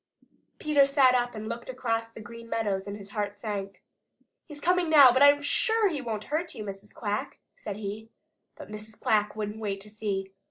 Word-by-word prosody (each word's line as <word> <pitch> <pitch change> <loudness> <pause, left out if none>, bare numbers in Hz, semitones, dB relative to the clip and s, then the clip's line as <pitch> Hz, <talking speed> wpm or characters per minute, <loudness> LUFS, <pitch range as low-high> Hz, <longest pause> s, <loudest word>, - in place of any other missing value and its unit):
Peter 300 -3 +4
sat 275 -2 +4
up 245 -1 0
and 215 0 -6
looked 235 +2 -6
across 230 -3 -2
the 230 - -12
Green 230 +1 -11
Meadows, 205 -4 -1
and 200 +1 -5
his 200 -1 -12
heart 205 -1 -3
sank. 200 -2 -5 0.6
"He's 295 -3 -10
coming 355 +1 +2
now, 285 -5 +9
but 260 +2 +1
I'm 285 0 +6
sure 445 +7 +2
he 300 -6 -3
won't 220 -4 -4
hurt 335 +3 -1
you, 215 - -6
Mrs. 200 0 -8
Quack," 205 -1 -3 0.2
said 205 - -6
he. 215 +1 -6 0.5
But - - -11
Mrs. 215 0 -9
Quack 210 -1 +1
wouldn't 210 0 -4
wait 200 -3 -3
to 210 +1 -11
see. 195 -3 -3
220 Hz, 195 wpm, -28 LUFS, 205-270 Hz, 0.6 s, now